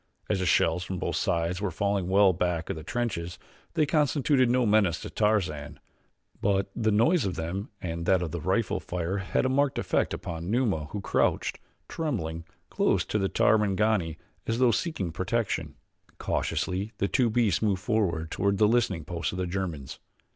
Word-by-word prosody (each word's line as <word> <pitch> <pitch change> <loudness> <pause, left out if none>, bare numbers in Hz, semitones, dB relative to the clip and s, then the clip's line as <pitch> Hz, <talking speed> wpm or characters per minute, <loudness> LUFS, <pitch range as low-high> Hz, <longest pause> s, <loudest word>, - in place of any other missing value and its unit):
As 100 - +1
the 90 - 0
shells 80 +2 +3
from 95 +1 -4
both - - -2
sides 85 +3 0
were 105 - 0
falling 100 +1 -1
well 95 0 +5
back 85 -1 -1
of - - -3
the 80 - -7
trenches, 90 -5 -3 0.4
they 155 -2 +3
constituted 145 -3 +2
no 125 0 +3
menace 105 -6 +3
to - - -7
Tarzan; 95 -9 0 0.6
but 100 -1 +1
the 110 -2 +1
noise 120 - +3
of 95 -3 -2
them 90 +7 -4
and 85 -1 -4
that 95 -2 +3
of 80 - -4
the 85 - -4
rifle 95 +5 0
fire 90 +2 -3
had 100 +5 0
a - - +4
marked 135 +1 +1
effect - - 0
upon 85 +1 -5
Numa 110 - +1
who 100 +7 -6
crouched, - - 0 0.3
trembling, 85 - -3 0.3
close - - +2
to 105 - -1
the 95 -1 0
Tarmangani 105 -5 +2 0.3
as 115 - 0
though 125 -1 +4
seeking 110 - -2
protection. 90 -4 -2 0.4
Cautiously 100 +4 -2
the 100 - +1
two 125 +2 +2
beasts 110 -4 +2
moved 100 -4 0
forward 85 -8 0
toward 100 +1 +1
the 105 +1 +5
listening 105 -8 +1
post 85 -1 -3
of 90 - -6
the 90 - -1
Germans. 85 -7 -4
95 Hz, 175 wpm, -27 LUFS, 85-110 Hz, 0.6 s, well